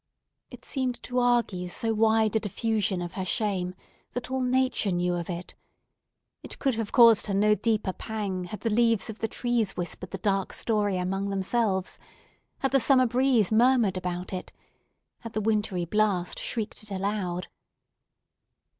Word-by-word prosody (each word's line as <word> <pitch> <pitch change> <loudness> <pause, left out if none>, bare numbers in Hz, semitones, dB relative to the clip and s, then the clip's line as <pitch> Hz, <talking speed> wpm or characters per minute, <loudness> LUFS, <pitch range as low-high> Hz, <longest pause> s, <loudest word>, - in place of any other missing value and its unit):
It - - -12
seemed 260 -3 -2
to 250 0 -1
argue 235 -7 +1
so 225 +5 -1
wide 220 0 +3
a - - +4
diffusion 210 -3 -1
of 175 +1 -6
her 190 - -3
shame, 185 -2 -1 0.4
that 245 +1 -5
all 265 0 0
nature 255 -4 +1
knew 175 0 0
of 175 0 -4
it; 175 0 -5 0.9
it - - -7
could 270 -3 +1
have 225 -2 -3
caused 230 -4 +6
her 200 - -1
no 210 +2 +4
deeper 210 -3 0
pang 200 -5 -4
had 190 +3 -7
the 225 - -1
leaves 230 -2 +2
of 220 - -13
the 225 - -1
trees 235 -3 -1
whispered 180 +1 -4
the - - -5
dark 195 -3 -1
story 205 -4 0
among 195 +2 -2
themselves—had 195 +5 -3
the 270 - +4
summer 255 0 +5
breeze 245 -4 +2
murmured 230 -3 +4
about 180 0 -4
it—had 215 +4 -11
the 215 - -1
wintry 210 -4 0
blast 195 -2 0
shrieked 220 -3 -4
it 215 - -12
aloud! 190 -2 -2
210 Hz, 155 wpm, -27 LUFS, 185-230 Hz, 0.9 s, caused